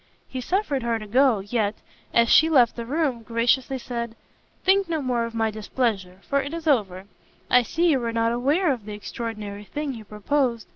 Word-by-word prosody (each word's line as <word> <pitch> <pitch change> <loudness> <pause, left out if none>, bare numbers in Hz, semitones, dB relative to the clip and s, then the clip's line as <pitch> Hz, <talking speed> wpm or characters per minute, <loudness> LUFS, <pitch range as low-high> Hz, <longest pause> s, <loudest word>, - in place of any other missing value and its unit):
He 260 - -5
suffered 310 - -1
her 235 -1 0
to 215 - -8
go, 245 -1 +3
yet, 210 0 -1 0.4
as 235 0 +4
she 320 +6 +6
left 250 -7 +4
the 235 -1 -6
room, 280 -4 0
graciously 240 +4 +1
said, 235 -2 -5 0.5
"Think 385 -1 +3
no 320 -2 0
more 250 -4 0
of 230 0 -7
my 225 -1 +1
displeasure, 205 -4 -2
for 280 0 +2
it 285 +4 -5
is 335 -1 -6
over: 200 - +1 0.5
I 250 - +7
see 330 +8 +1
you 275 - +2
were 235 -1 -2
not 230 0 +1
aware 285 +8 +2
of 240 -6 -4
the 210 - -6
extraordinary 210 -1 -6
thing 290 +4 -4
you 225 -3 -9
proposed. 230 +2 -1
235 Hz, 195 wpm, -24 LUFS, 220-280 Hz, 0.5 s, I